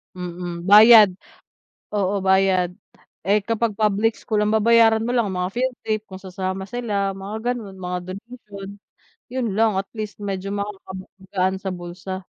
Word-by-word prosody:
Mhm, 175 0 -6
bayad, 215 0 +9 0.8
oo 200 -1 0
bayad, 190 -2 +3 0.6
eh, 205 0 +3
kapag 225 -1 -1
public 215 +1 +1
school 215 -3 -2
ang 210 - +1
babayaran 225 0 +4
mo 240 - -1
lang 235 -4 +1
mga 180 0 -3
field 250 +1 -1
trip 215 -1 0
kung 190 - -9
sasama 190 0 -5
sila 205 -3 -2
mga 215 +5 -3
ganon 210 -6 -8
mga 180 -1 -4 0.2
donation, 210 -3 -11 0.6
yun 255 -1 -3
lang 225 -1 +3
at 195 - -21
least 215 -1 -6
medyo 195 0 -4
makakagaan 190 -1 -4
sa 190 -1 -4
bulsa. 180 +2 -7
200 Hz, 145 wpm, -22 LUFS, 190-220 Hz, 0.8 s, bayad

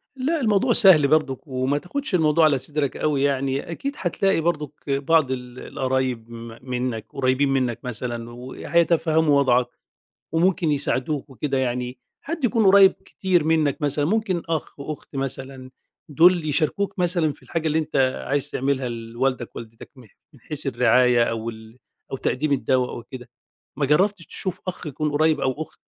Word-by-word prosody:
لا 290 +4 -1
الموضوع 230 +2 +2
سهل 180 -10 +7
برضك 150 -1 0
وما 130 +2 -1
تاخدش 220 - -3
الموضوع 160 -1 +3
على 145 -3 +3
صدرك 145 +1 -3
أوي 145 -3 0
يعني، 140 +2 -1
أكيد 280 - -4
هتلاقي 190 0 0
برضك 150 -4 -1 0.2
بعض 140 0 +2
ال 125 -1 -6
القرايب 130 -4 -2
م 115 0 -9
منك 125 -3 -3
قريبين 135 +1 +1
منك 130 -4 0
مثلًا 120 -1 -5
وهيتفهموا 155 +4 +1
وضعك 125 -2 +3 0.7
وممكن 170 -1 +2
يساعدوك 145 0 -1
وكده، 135 0 -2
يعني 125 0 -2 0.2
حد 315 -2 -5
يكون 230 -2 +2
قريب 195 0 +7
كتير 180 -5 -1
منك 155 -2 +1
مثلًا 145 0 +1
ممكن 190 -2 0
أخ، 160 -3 -3
أخت 145 -1 -7
مثلًا 135 -1 -5 0.4
دول 165 +1 +4
يشاركوك 190 +7 0
مثلًا 170 -4 +1
في - - -21
الحاجة 165 -1 -3
اللي 155 +1 +1
أنت 155 -2 -3 0.3
عايز 145 +1 -1
تعملها 135 -1 -1
لوالدك 120 +2 -3
ووالدتك 115 -1 -10
م - - -14 0.3
من - - -19
حيث - - -6
الرعاية 125 -2 +4
أو 115 0 -3
ال 110 +2 -14 0.3
أو - - -1
تقديم 145 +3 -1
الدواء 130 -2 +1
أو 120 - -7
كده، 125 -3 -9 0.5
ما 140 - 0
جربتش 185 +4 +2
تشوف 185 -1 -4
أخ 180 -2 -5
يكون 150 +1 -2
قريب 155 +1 +2
أو 130 - +1
أخت؟ - - -12
145 Hz, 155 wpm, -23 LUFS, 130-165 Hz, 0.7 s, سهل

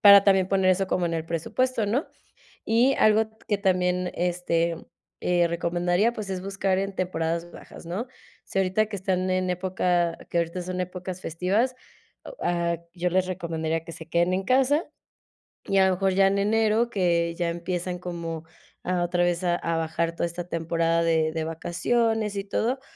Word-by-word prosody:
para 200 -3 +9
también 195 -2 +4
poner 190 -1 +3
eso 190 +1 +2
como 180 -1 0
en 165 - -2
el 160 0 -3
presupuesto, 225 +8 0
¿no? 245 +9 0 0.6
Y 240 +5 +4
algo 215 0 +4 0.2
que 205 - +1
también, 180 -2 +1
este, 170 -1 0 0.5
eh, 175 -1 +3
recomendaría, 175 +5 +1
pues 215 -4 -6
es 185 -1 -3
buscar 195 -1 -1
en 195 0 -2
temporadas 170 -2 -2
bajas, - - -12
¿no? 195 +9 -4 0.4
Sí, 195 - -2
ahorita 195 +3 +2
que 205 -2 -5
están 185 0 -1
en 185 0 0
época, 180 -2 0
que 170 - +1
ahorita 170 +2 -2
son 180 +1 -3
épocas 180 0 -6
festivas, 195 +10 0 0.5
o, - - -9
ah, 170 -1 +1 0.2
yo 180 0 -1
les 185 +1 +2
recomendaría 165 -2 -2
que 165 - -8
se 160 0 -11
queden 175 +2 +2
en 190 +1 0
casa 270 - +3 0.8
y 195 - +1
a 190 - +6
lo 190 - +3
mejor 190 +1 +1
ya 195 0 +5
en 195 +1 +2
enero, 220 +3 +2
que 170 -4 +1
ya 175 -1 0
empiezan 175 +1 -3
como 170 -2 -5 0.4
a 180 -1 0
otra 175 0 +1
vez 175 +1 +1
a 175 -1 +2
a 165 -1 -1
bajar 165 +1 -1
toda - - 0
esta 170 +1 -5
temporada 165 0 +1
de 160 -1 +2
de 160 0 -3
vacaciones 210 +7 0
y 200 - -2
todo, 240 +6 -1
180 Hz, 180 wpm, -26 LUFS, 170-195 Hz, 0.8 s, para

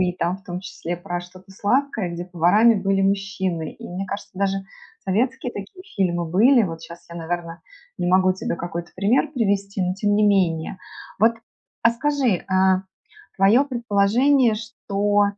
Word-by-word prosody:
и 180 -1 +2
там 175 0 -1
в 195 - -21
том 180 0 -5
числе 175 -2 -5
про 175 0 -4
что-то 185 +2 -15
сладкое, 215 0 0
где 170 +1 -5
поварами 180 +6 +4
были 195 -1 +1
мужчины. 195 -4 -1
И - - -11
мне 185 +2 -4
кажется, 200 +2 -6
даже 195 0 +1 0.5
советские 250 +6 0
такие 205 - -9
фильмы 175 -3 +1
были. 225 +10 +4
Вот 165 -5 -3
щас 170 0 -11
я, 170 - -8
наверно, 170 0 -4 0.4
не - - -1
могу 185 +1 +4
тебе 190 - -3
какой-то 170 0 -6
пример 205 +7 +1
привести, 200 -4 0
но 180 0 0
тем 205 +1 +1
не 210 +1 +3
менее. 185 -4 +1 0.4
Вот, 225 +2 +4 0.5
а 230 - +6
скажи, 280 +2 0
э, - - -12 0.9
твоё 210 +7 +5
предположение, 240 +1 +2
что 205 -2 0
195 Hz, 160 wpm, -22 LUFS, 175-220 Hz, 0.9 s, а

